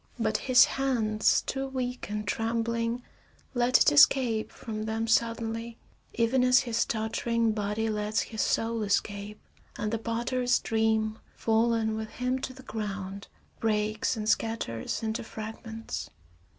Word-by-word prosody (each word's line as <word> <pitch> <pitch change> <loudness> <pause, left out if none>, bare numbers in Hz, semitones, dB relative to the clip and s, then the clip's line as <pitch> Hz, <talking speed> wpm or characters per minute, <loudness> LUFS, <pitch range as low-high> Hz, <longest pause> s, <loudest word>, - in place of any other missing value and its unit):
But 220 -2 +1
his 255 - +8
hands, 225 -6 +1
too 270 0 -3
weak 255 -3 -4
and 210 0 -3
trembling, 230 +2 -1 0.5
let 245 0 +4
it - - +5
escape 220 - +5
from 215 -1 -6
them 220 +1 -1
suddenly, 230 0 0 0.4
even 240 +2 +2
as 250 0 +6
his 235 -2 0
tottering 230 +1 0
body 210 +1 -1
lets 210 0 0
his 220 -2 -4
soul 225 0 0
escape 205 0 -1 0.4
and 210 +1 -2
the 225 - 0
potter's 240 +2 0
dream, 220 -1 0 0.2
fallen 225 -1 +1
with 220 0 -4
him 250 +2 -2
to 260 - -4
the 260 0 -13
ground, 200 -4 -5 0.3
breaks 215 +1 0
and 215 -1 -3
scatters 225 - -1
into 220 +1 -2
fragments. 225 0 -6
225 Hz, 135 wpm, -28 LUFS, 215-235 Hz, 0.5 s, his